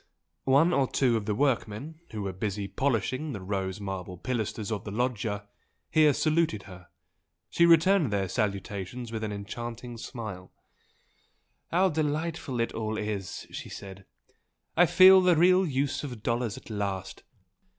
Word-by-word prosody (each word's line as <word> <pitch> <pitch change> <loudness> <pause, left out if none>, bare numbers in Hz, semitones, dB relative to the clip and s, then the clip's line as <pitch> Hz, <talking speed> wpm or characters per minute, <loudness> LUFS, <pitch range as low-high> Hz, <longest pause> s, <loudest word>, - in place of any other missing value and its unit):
One 155 +6 +5
or 135 - +3
two 125 -4 +2
of 110 -2 -2
the 105 - 0
workmen 135 +3 -1
who 105 -2 -5
were 95 -1 -3
busy 100 +1 -3
polishing 130 +4 -1
the 105 - -5
rose 95 0 -3
marble 95 -2 -5
pilasters 110 -1 -3
of 105 -3 -2
the - - -6
loggia, 105 -2 -2 0.4
here 155 -1 +6
saluted 155 -9 +1
her 90 -2 -12 0.6
she 170 - +4
returned 170 -1 +5
their 100 -2 0
salutations 100 +3 -3
with 110 -1 -4
an 105 - -2
enchanting 120 +4 -6
smile. 105 -7 -7 1.2
"How 185 +3 +3
delightful 155 -3 -2
it 115 - 0
all 110 -1 -3
is!" 105 -3 -4
she - - -7
said 95 -1 -10 0.7
"I 175 +1 +6
feel 190 +3 +8
the 180 -1 +4
real 180 +3 +5
use 140 0 -1
of 125 -6 -7
dollars 115 -2 -1
at - - -11
last! 100 -3 -3
115 Hz, 150 wpm, -28 LUFS, 100-145 Hz, 1.2 s, feel